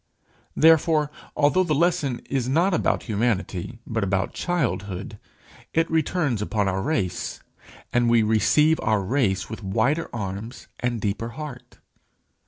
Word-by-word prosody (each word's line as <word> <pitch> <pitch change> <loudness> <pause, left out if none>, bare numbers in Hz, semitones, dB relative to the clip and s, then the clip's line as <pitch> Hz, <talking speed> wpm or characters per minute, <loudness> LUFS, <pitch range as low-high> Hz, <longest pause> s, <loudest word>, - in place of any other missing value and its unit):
Therefore, 160 -1 +4 0.3
although 150 +6 +4
the 155 -4 0
lesson 145 -6 +1
is 130 -2 -1
not 170 +7 +2
about 170 - +1
humanity, 105 -2 -1
but 115 -2 -2
about 95 0 0
childhood, 105 - -2 0.6
it 165 0 +3
returns 155 - 0
upon 105 -1 0
our 95 0 0
race, 95 - -2 0.5
and 120 -1 +3
we 115 -1 +4
receive 150 +9 +3
our 110 -2 +1
race 100 -3 0
with 110 +1 -7
wider 115 +11 0
arms 105 +2 -6
and 125 -2 -1
deeper 105 +3 -2
heart. 125 -5 -8
120 Hz, 130 wpm, -24 LUFS, 105-150 Hz, 0.6 s, Therefore